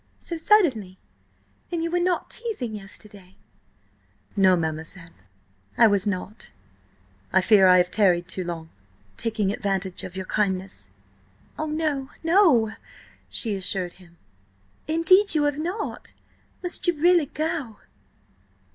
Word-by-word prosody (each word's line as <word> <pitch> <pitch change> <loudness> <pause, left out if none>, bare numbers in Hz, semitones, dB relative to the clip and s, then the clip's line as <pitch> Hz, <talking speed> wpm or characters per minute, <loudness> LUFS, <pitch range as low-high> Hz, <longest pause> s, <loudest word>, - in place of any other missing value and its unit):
"So 340 - -6
suddenly? 290 - +2 0.7
Then 335 -1 -2
you 335 - -2
were 355 - +1
not 355 0 -1
teasing 425 - -4
yesterday?" 200 -2 -10 1.0
"No, 190 -2 +5
mademoiselle–I 155 - -3
was 205 -2 +2
not. 205 +2 -4 0.8
I 190 - +4
fear 195 0 +5
I 180 0 +7
have 180 0 +2
tarried 180 -4 +2
too 190 0 -1
long, 165 -2 -6 0.4
taking 220 -4 -1
advantage 195 -3 -3
of 185 - -8
your 190 0 -5
kindness." 190 - -1 0.6
"Oh, 310 - -3
no, 300 -3 -2
no!" 325 - +4 0.6
she 225 -3 +1
assured 185 -2 -3
him. 170 -1 -19 0.7
"Indeed, 330 +5 +4
you 300 - +3
have 290 0 0
not! 360 +7 -5 0.5
Must 355 0 +2
you 345 -4 +1
really 345 -2 +4
go?" 300 -8 -3
210 Hz, 120 wpm, -24 LUFS, -, 1.0 s, I